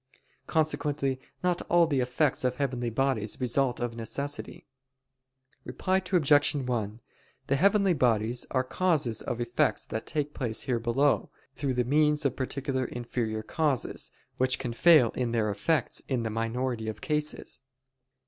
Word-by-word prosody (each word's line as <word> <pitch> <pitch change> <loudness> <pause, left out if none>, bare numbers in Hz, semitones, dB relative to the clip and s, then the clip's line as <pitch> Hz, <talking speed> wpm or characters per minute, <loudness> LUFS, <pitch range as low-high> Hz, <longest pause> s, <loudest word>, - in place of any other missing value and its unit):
Consequently 145 -4 0 0.2
not 180 -1 +1
all 170 0 +5
the 145 -4 0
effects 125 +3 +1
of 125 0 +1
heavenly 125 -3 -1
bodies 115 -3 -1
result 125 0 +1
of 120 -1 -3
necessity. 140 +6 -4 1.0
Reply 185 0 0
Obj. 155 -7 +3
1: 120 -5 -2 0.5
The 140 - +1
heavenly 200 +3 +4
bodies 120 -4 +1
are 130 -1 +1
causes 145 - 0
of 120 - -4
effects 120 0 0
that 110 - -5
take 150 -1 -2
place 115 -5 -2
here 125 -3 0
below, 130 +5 +1 0.2
through 135 -2 -2
the 125 - +2
means 150 +2 +2
of 135 - +1
particular 130 0 -2
inferior 115 -3 -3
causes, 145 0 -1 0.3
which 130 0 +2
can 125 -3 -4
fail 140 -2 +6
in 120 -2 -2
their 110 -2 +1
effects 145 +11 0
in 125 -4 -1
the 110 - -2
minority 115 +1 -2
of 105 -1 -6
cases. 150 0 -1
130 Hz, 145 wpm, -28 LUFS, 120-145 Hz, 1.0 s, fail